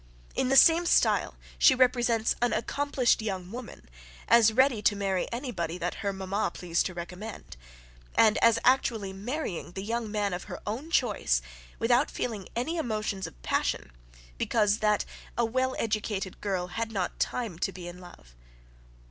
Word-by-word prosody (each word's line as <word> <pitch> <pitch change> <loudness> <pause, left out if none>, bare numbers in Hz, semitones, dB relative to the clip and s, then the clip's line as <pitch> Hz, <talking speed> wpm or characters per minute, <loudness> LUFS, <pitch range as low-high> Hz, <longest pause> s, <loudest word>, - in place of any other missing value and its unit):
In 255 - 0
the 270 - +4
same 335 +3 +7
style - - +3 0.2
she 265 - +7
represents 240 -3 +2
an 245 - +2
accomplished 270 -2 +1
young 190 -4 -4
woman, 245 - -9 0.4
as 230 -2 +6
ready 255 -1 +3
to 205 - +3
marry 195 -2 -1
any 250 +2 -4
body 170 -4 -3
that 175 0 -2
her 200 - 0
MAMMA 195 +1 -2
pleased 175 -1 0
to 185 - -9
recommend; 180 - -8 0.6
and, 220 -1 +5
as 230 -1 +5
actually 225 -6 +2
marrying 200 - -4
the 195 - -5
young 230 +1 -2
man 205 -2 -1
of 180 - -5
her - - -7
own 240 +10 -4
choice, 210 - +2 0.4
without 245 +5 +3
feeling 215 -6 -4
any 310 +9 -1
emotions 215 -8 -2
of - - -14
passion, 65 - -1 0.5
because 210 -1 +2
that 210 -1 +2 0.3
a 235 - +3
well 260 +3 0
educated 210 -3 -2
girl 190 -3 -1
had 225 +5 -3
not 190 -5 -3
time 220 -9 -2
to 195 - 0
be 180 -2 -9
in 175 +1 -9
love. 175 - -15
215 Hz, 165 wpm, -28 LUFS, 190-240 Hz, 0.6 s, same